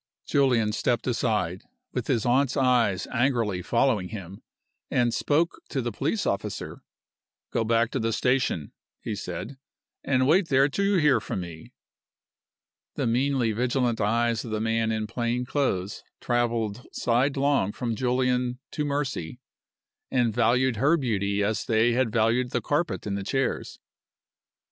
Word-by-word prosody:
Julian 125 -7 +2
stepped 120 +2 0
aside 105 -8 0 0.3
(with - - -3
his 115 - +1
aunt's 130 +3 +2
eyes 120 -8 +2
angrily 115 -7 +1
following 115 -2 +1
him) 95 -3 -8 0.5
and 120 -1 +1
spoke 160 +3 +1
to 140 - -2
the 120 -2 -2
police 155 - -1
officer. 100 - -3 0.7
"Go 115 - +1
back 115 +1 +2
to - - -1
the 115 0 0
station," 125 - 0 0.3
he - - -4
said, 135 -1 -6 0.4
"and 130 -2 +2
wait 175 +4 +4
there 135 -2 +4
till 200 +8 -1
you 200 0 +2
hear 150 -8 +4
from 95 - -4
me." 85 -2 -10 1.2
The - - -1
meanly 125 0 +1
vigilant 120 0 0
eyes 115 +2 +1
of 120 - -7
the 110 0 -2
man 115 0 0
in 110 -1 -1
plain 120 +2 -2
clothes 105 -9 -1 0.2
traveled 120 -2 -1
sidelong 135 -2 +1
from 115 0 -3
Julian 125 +1 0
to 150 - -2
Mercy, 140 - -3 0.7
and 120 -4 +1
valued 120 +1 +2
her 145 +8 +3
beauty 100 -7 0
as 110 +2 0
they 115 +1 +2
had 120 -1 +1
valued 115 +2 +2
the - - 0
carpet 160 +4 -1
and 100 -1 -2
the 100 - -3
chairs. 135 +6 -2
120 Hz, 145 wpm, -26 LUFS, 110-130 Hz, 1.2 s, wait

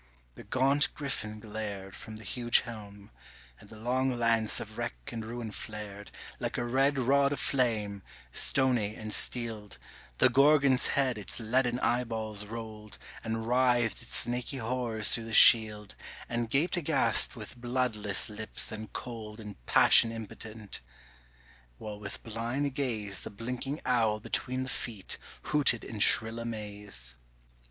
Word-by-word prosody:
the - - -12
gaunt 135 +3 +2
Griffin 110 -7 -4
glared 105 -3 -6
From 110 -1 -10
the 110 - -11
huge 120 +3 +2
helm, 105 -3 -10 0.5
and - - -16
the 110 - -12
long 125 +3 -1
lance 115 -2 +3
of - - -8
wreck - - -3 0.2
and 115 -1 -5
ruin 115 0 -6
flared 105 -2 -7 0.3
Like - - -3
a 120 - -1
red 135 +3 +2
rod 140 +2 +3
of 145 - -2
flame, 110 -7 0 0.3
stony 125 -6 +2
and 110 -1 -5
steeled 110 -4 -2 0.4
The - - +6
Gorgon's 140 0 +4
head 130 -5 +2
its 105 - -3
leaden 120 +2 +1
eyeballs 110 -4 -1
rolled, 110 -1 -8 0.3
And 115 0 -3
writhed 120 -2 +2
its 115 - -1
snaky 125 +3 0
horrors 115 -3 0
through 115 - +3
the 115 -1 -2
shield, 105 -2 +6 0.3
And 120 -1 -2
gaped 155 +9 +1
aghast 140 -8 +3
with 115 +1 -9
bloodless 120 -5 0
lips 110 0 -5
and 110 0 -7
cold 110 -3 -7
In 105 -2 -8
passion 115 - +7
impotent, 110 -1 -8 1.0
while 105 - -8
with 100 0 -8
blind 120 +5 -3
gaze 110 -8 -2
The - - -6
blinking 125 +7 -5
owl 115 -4 +2
between 130 +4 -3
the 130 - -6
feet 110 -8 -3 0.2
hooted 135 -6 +3
in 110 - -7
shrill 110 +2 +6
amaze. 105 - -6
115 Hz, 145 wpm, -30 LUFS, 105-125 Hz, 1.0 s, passion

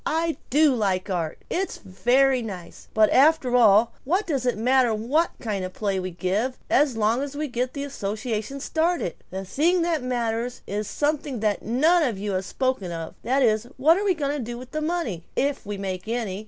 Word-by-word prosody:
I 325 0 0
do 295 +1 +4
like 195 -3 0
art. 165 -4 -2
It's 380 +2 -2
very 250 +7 +2
nice. 190 -6 -8
But 215 -1 +5
after 275 -2 +4
all, 225 -1 +5
what 365 +9 0
does 270 -6 -1
it 245 - +1
matter 245 0 +3
what 275 +10 +1
kind 210 -5 -3
of 185 0 -5
play 200 -3 -1
we 185 0 -3
give 195 +8 -1
as 275 -4 +3
long 225 +4 +2
as 285 0 -5
we 300 +1 -2
get 250 0 -2
the 280 - -4
association 220 0 -4
started? 320 - 0 0.2
The 190 +1 -5
thing 335 - +2
that 335 -3 0
matters 240 -1 -2
is 205 +1 -3
something 290 -4 -1
that 210 -2 0
none 310 +10 +3
of 245 -10 0
you 205 +1 -3
have 185 0 -1
spoken 255 -9 -1
of, 165 -1 -5
that 260 +4 +1
is: 220 -1 +2
what 310 +6 +5
are 395 - -1
we 390 -3 +2
going 290 -2 -1
to 285 - -3
do 240 +1 -6
with 250 +1 -10
the 310 - -2
money, 305 - -2
if 280 -5 -1
we 205 -1 -4
make 190 0 -4
any? 220 -5 -2
245 Hz, 205 wpm, -24 LUFS, 205-285 Hz, 0.2 s, But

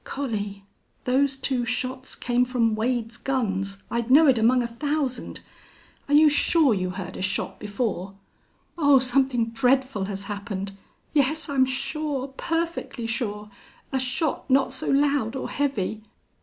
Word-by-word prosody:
"Collie!... 205 -7 -4 0.4
Those 270 +2 +2
two 260 -2 0
shots 255 +2 -3
came 245 0 +1
from 245 -3 +1
Wade's 230 +1 -1
guns 200 -8 -2
I'd 235 0 -1
know 295 +5 +7
it 260 -5 +4
among 245 +3 +4
a - - -2
thousand!... 275 +1 -2 0.7
Are 290 - +3
you 305 +1 +7
sure 295 -2 +4
you 185 -2 -1
heard 185 0 -6
a - - -5
shot 190 +1 -2
before?" 200 -3 -3 0.6
"Oh, 285 -3 +6
something 255 -2 +1
dreadful 255 -3 +1
has 195 0 -5
happened! 200 -1 -5 0.4
Yes, 310 +3 +2
I'm 270 -3 +2
sure. 275 +1 -2
Perfectly 330 -3 -3
sure. 210 -3 -3 0.4
A 265 - 0
shot 260 +4 -1
not 270 0 +3
so 260 - -2
loud 280 -4 +2
or 265 - -3
heavy." 220 -7 -1
255 Hz, 140 wpm, -25 LUFS, 215-275 Hz, 0.7 s, know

